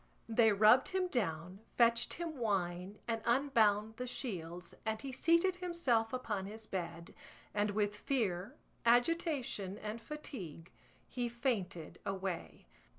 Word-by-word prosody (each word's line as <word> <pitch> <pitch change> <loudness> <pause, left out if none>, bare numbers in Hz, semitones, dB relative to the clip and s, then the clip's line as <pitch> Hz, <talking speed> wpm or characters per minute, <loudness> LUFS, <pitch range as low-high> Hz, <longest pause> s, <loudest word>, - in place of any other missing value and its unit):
They 225 -1 +5
rubbed 215 +5 +6
him 375 -1 0
down, 180 - -2 0.2
fetched 235 0 +4
him 335 -2 -4
wine 190 -3 -1
and 225 -1 -1
unbound 225 -4 +3
the 250 - -4
shields, 180 -9 -5
and 220 -1 -1
he 275 - -5
seated 335 +7 +3
himself 340 -11 +1
upon 215 -6 -2
his 220 +2 -8
bed, 170 -4 -5 0.4
and 210 0 +1
with 205 0 0
fear, 205 -6 -1 0.3
agitation, 245 - +2
and 215 +2 -5
fatigue 210 - -7 0.4
he 245 -1 -2
fainted 220 - -2
away. 185 - -4
220 Hz, 125 wpm, -35 LUFS, 190-255 Hz, 0.4 s, rubbed